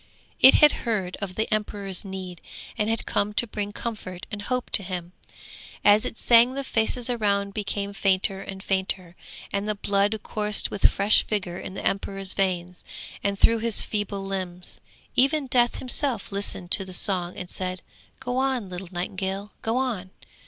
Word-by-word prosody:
It 265 - +9
had 300 -1 +7
heard 200 -6 -2
of 190 -2 -5
the 220 - 0
emperor's 205 -3 -2
need, 190 -3 -7 0.3
and 210 +1 0
had 225 0 +1
come 205 +1 0
to 210 - +3
bring 210 -2 -4
comfort 200 -5 -6
and 205 -1 -4
hope 250 +4 -2
to - - +6
him. 180 -2 -5 0.7
As 205 +1 +6
it 225 - -5
sang 240 +2 +5
the 275 - -3
faces 235 -1 +1
round 200 -4 0
became 200 -1 -3
fainter 195 0 +1
and 195 0 -8
fainter, 190 -3 -2 0.4
and 200 +1 -1
the 210 - 0
blood 200 +2 +1
coursed 210 -1 +1
with 200 - +4
fresh 200 +2 +3
vigour 190 -4 -2
in 190 - -7
the - - -6
emperor's 195 -1 -1
veins 180 -2 -1 0.4
and 200 0 0
through 230 +3 +4
his 230 -1 +3
feeble 205 -2 -3
limbs. 185 -2 -5 0.4
Even 275 +3 +3
Death 245 -2 +2
himself 255 -4 0
listened 195 -2 -1
to 195 - +6
the 185 -1 -8
song 180 -1 +1
and 180 - -6
said, 185 0 -3 0.4
'Go 250 -1 -3
on, 260 -6 0
little 180 0 -7
nightingale, 190 +3 -4
go 225 +2 -1
on!' 235 -8 -2
200 Hz, 170 wpm, -25 LUFS, 190-225 Hz, 0.7 s, It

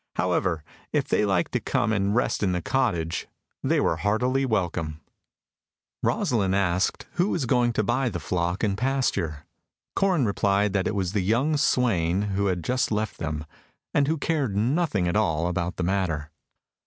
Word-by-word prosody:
However, 90 -2 0 0.3
if - - 0
they 105 - +2
liked 95 -3 +1
to - - 0
come 110 - 0
and 100 0 +1
rest 125 - +1
in 95 -3 +1
the 90 - -1
cottage, 85 -12 0 0.4
they - - +2
were 80 - +1
heartily 125 +8 +1
welcome. 85 -8 -1 1.0
Rosalind 100 -6 +1
asked 95 -1 +1
who 180 +3 +3
was 165 -9 0
going 120 0 +2
to 110 - +1
buy 120 +4 +1
the 90 -6 -4
flock 90 +2 -1
and 100 -3 +1
pasture. 100 - -1 0.5
Corin 185 -9 +2
replied 100 -1 +1
that 100 -2 +1
it - - -2
was 95 -3 -1
the 105 - +1
young 120 +11 +2
swain 100 - +2
who 100 +1 +1
had 90 -3 -1
just 125 +2 0
left 105 -1 -2
him, 80 -2 -3 0.5
and 140 -1 +3
who 160 +2 +1
cared 140 -8 -1
nothing 120 - +1
at 85 - 0
all 85 -7 +1
about 90 0 -2
the 90 - -2
matter. 85 -5 -1
100 Hz, 170 wpm, -25 LUFS, 90-125 Hz, 1.0 s, who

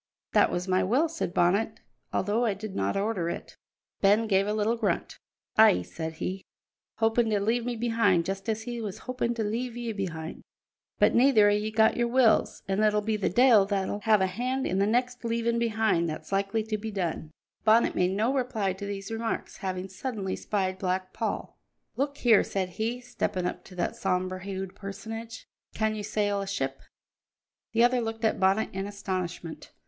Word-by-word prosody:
"That - - +5
was 175 +2 -2
my 185 0 +2
will," 255 - +2
said 325 - -3
Bonnet, 195 +6 +1 0.3
"although 210 +5 +1
I 215 -4 +1
did 205 0 -7
not 95 - 0
order 195 -4 -1
it." - - -6 0.5
Ben 210 +3 +4
gave 195 -2 +2
a 210 - 0
little 215 +2 +1
grunt. 210 -7 -2 0.4
"Ay," 90 - +7
said 160 - -6
he, 185 +4 -4 0.6
"hopin' 225 +1 +2
to 210 -2 +2
leave 230 +4 0
me 245 - -1
behind 225 -7 +2
just 195 +3 -4
as 220 0 -1
he 240 -1 -5
was 205 -4 -5
hopin' 250 -2 -1
to 225 - -1
leave 235 +3 -3
ye 240 -1 -3
behind. 165 -5 -5 0.6
But - - +4
neither 235 -5 +5
o' - - +3
ye 210 +1 0
got 220 0 +3
your 240 0 +2
wills, 240 -2 +3
an' 195 +2 0
it'll 210 -1 +3
be 220 +1 0
the 210 - 0
de'il 225 -1 +5
that'll 200 0 -1
have 215 -2 +3
a - - +4
hand 250 +8 -2
in 190 - 0
the 200 - +3
next 245 +2 0
leavin' 235 0 0
behind 220 -7 +1
that's 155 - -7
likely 200 +3 0
to 215 -1 -3
be 220 +1 -4
done." 175 -6 -3 0.3
Bonnet 225 +2 +4
made 180 +1 +1
no 225 +5 +2
reply 245 -8 0
to 195 +2 -7
these 200 +1 -5
remarks, 225 0 -3
having 185 -1 -4
suddenly 195 0 -4
spied 190 -2 -2
Black 185 0 -2
Paul. - - -4 0.4
"Look 280 +1 -1
here," 230 -4 +5
said 190 -2 -2
he, 225 +6 -3
stepping 185 -6 -2
up - - -3
to 185 - -13
that 175 - -1
sombre 185 0 -1
hued 190 -1 -5
personage, 225 +3 -7 0.3
"can 220 0 +1
you 215 - -4
sail 205 -1 0
a 195 - -5
ship?" 135 -9 -3 0.9
The 230 +1 +4
other 245 0 +4
looked 225 0 -3
at 220 - +1
Bonnet 195 +3 +3
in 195 +1 -3
astonishment. 185 -5 -5
210 Hz, 190 wpm, -28 LUFS, 190-230 Hz, 0.9 s, Ay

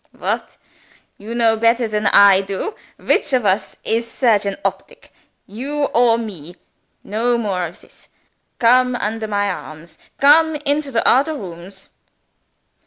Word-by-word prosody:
"What! - - -4 0.6
you 220 +3 -7
know 230 -2 +3
better 230 +1 +2
than 210 -1 -1
I 200 -1 +6
do? 195 - -5 0.2
Which 290 - 0
of 250 -4 +1
us 190 +1 0
is 230 +1 -2
surgeon 210 -6 +1
optic 195 0 -5 0.3
you 275 +8 -4
or 235 -1 +4
me? 180 -8 -8 0.5
No 235 +3 0
more 190 -6 -2
of 170 - -14
this. - - -23 0.5
Come 250 +1 +3
under 220 -1 -3
my 205 -1 -1
arms! 155 -1 -10 0.2
Come 315 +3 +5
into 290 0 -2
the 230 -4 0
odder 290 +5 +3
rooms!" 190 - -10
225 Hz, 135 wpm, -19 LUFS, 195-250 Hz, 0.6 s, I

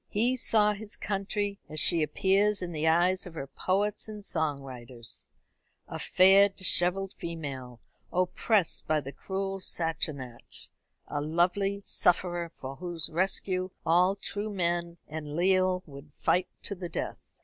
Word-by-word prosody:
He 235 +5 +1
saw 210 -4 +3
his 210 0 -8
country 200 0 -2
as 155 - 0
she 170 +2 +6
appears 195 +6 +2
in 175 - -4
the 160 -1 -1
eyes 180 +3 +3
of 170 - -11
her 135 - -4
poets 195 +9 -1
and 210 -2 -8
song 155 -6 -1
writers 120 -3 -6 0.6
a - - -6
fair 195 +2 +6
dishevelled 185 0 +3
female, 135 -7 -6 0.3
oppressed 185 +1 +1
by 155 0 +2
the 140 -1 -7
cruel 195 +4 -4
Sassenach, 155 -9 -3 0.4
a 145 - -2
lovely 180 +6 +1
sufferer 175 -1 +2
for 135 +1 -7
whose 175 -3 -4
rescue 185 +1 0 0.2
all 180 +4 +4
true 205 +1 -3
men 170 -2 -1
and 150 -1 -6
leal 185 +1 +2
would 140 0 -12
fight 180 +1 +2 0.2
to - - -3
the 180 -2 -6
death. - - -4
180 Hz, 140 wpm, -29 LUFS, 155-195 Hz, 0.6 s, she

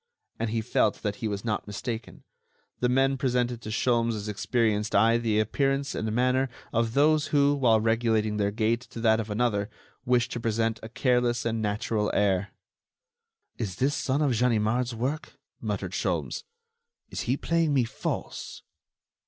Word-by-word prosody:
And 115 0 -1
he 115 +1 -1
felt 110 - +1
that 105 -2 -2
he 115 - -2
was 100 +1 -4
not 105 -2 -2
mistaken; 115 +3 -5 0.6
the 125 - +2
men 135 +2 +3
presented 125 -2 0
to 110 - -7
Sholmes' 115 -2 0
experienced 105 0 0
eye 115 +3 +5
the 110 -2 +1
appearance 135 +5 0
and 110 0 -2
manner 125 +3 +2 0.2
of 115 0 0
those 150 +1 +4
who, 145 -1 +3
while 120 -6 +4
regulating 110 -1 +1
their 100 -1 +1
gait 110 +3 0
to 120 - -10
that 110 -1 +3
of 110 -1 -4
another, 105 -2 0 0.3
wish 120 -1 +2
to 120 - -4
present 115 0 0
a 110 - -8
careless 125 0 +1
and 115 -1 -1
natural 105 0 0
air. 100 -1 +2 1.1
"Is 100 -7 -3
this 135 +8 +1
some 140 0 0
of 140 - +2
Ganimard's 120 +1 +1
work?" 140 +7 -3 0.3
muttered - - -3
Sholmes. - - -2 0.7
"Is - - -3
he 130 - +2
playing 165 -1 +1
me 130 - +4
false?" 115 - -5
115 Hz, 160 wpm, -27 LUFS, 110-125 Hz, 1.1 s, eye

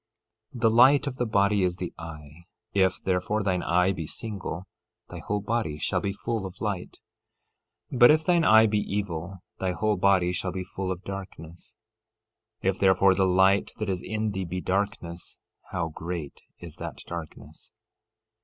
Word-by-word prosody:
13:22 120 - -7
The 115 - +5
light 130 +5 +6
of 140 -3 -3
the 125 - 0
body 100 -1 +2
is 90 -1 +1
the 90 -1 -5
eye; 80 0 -10 0.3
if, 95 -2 +2
therefore, 95 +3 0
thine 95 -2 0
eye 90 +2 +2
be 85 -5 -5
single, 95 -5 -5 0.4
thy - - -7
whole 105 0 -2
body 105 -8 -2
shall - - -1
be 100 - -1
full 110 +1 -3
of 90 0 -13
light. 100 -5 -4 0.9
13:23 130 - -4
But 120 - +9
if 155 +1 +4
thine 175 -2 +3
eye 110 -5 +7
be 105 -1 +1
evil, 95 -3 -4 0.2
thy 95 -1 -1
whole 105 +4 0
body 90 -2 +3
shall 90 +1 -2
be 90 0 -4
full 95 0 -4
of 90 0 -5
darkness. 95 0 -9 0.9
If, 95 0 0
therefore, 95 0 +5
the 95 0 +2
light 95 +2 +4
that 105 -2 -2
is 90 -1 -3
in 110 0 -2
thee 95 -1 -3
be 90 +2 -4
darkness, 90 -3 -3 0.3
how 85 -3 -2
great 80 -2 -6 0.2
is - - -11
that - - -6
darkness! 85 -2 -9
95 Hz, 170 wpm, -26 LUFS, 90-105 Hz, 0.9 s, But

